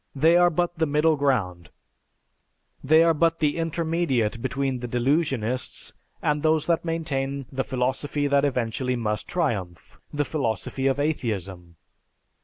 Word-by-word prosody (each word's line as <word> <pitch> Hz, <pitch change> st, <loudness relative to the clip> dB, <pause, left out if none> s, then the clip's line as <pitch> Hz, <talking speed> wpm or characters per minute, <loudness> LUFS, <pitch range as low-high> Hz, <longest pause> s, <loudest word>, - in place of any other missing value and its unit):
They 160 Hz, +5 st, +4 dB
are 175 Hz, 0 st, +6 dB
but 175 Hz, 0 st, -1 dB
the 160 Hz, -, +2 dB
middle 150 Hz, +2 st, +3 dB
ground; 105 Hz, -, -1 dB, 1.1 s
they 155 Hz, +4 st, +5 dB
are 165 Hz, 0 st, +4 dB
but 165 Hz, +1 st, +2 dB
the 150 Hz, -1 st, +1 dB
intermediate 165 Hz, -9 st, -1 dB
between 135 Hz, 0 st, -1 dB
the 120 Hz, -, -5 dB
delusionists 125 Hz, -1 st, -1 dB, 0.3 s
and 150 Hz, 0 st, +1 dB
those 155 Hz, -1 st, +2 dB
that 170 Hz, -1 st, +1 dB
maintain 140 Hz, -5 st, -2 dB
the 135 Hz, -1 st, -1 dB
philosophy 135 Hz, +3 st, -1 dB
that 140 Hz, 0 st, +3 dB
eventually 125 Hz, -2 st, -1 dB
must 105 Hz, -3 st, -2 dB
triumph, 105 Hz, -, -3 dB
the 145 Hz, 0 st, -1 dB
philosophy 135 Hz, -1 st, -2 dB
of 135 Hz, +1 st, +1 dB
atheism. 100 Hz, -, -3 dB
140 Hz, 135 wpm, -25 LUFS, 125-160 Hz, 1.1 s, are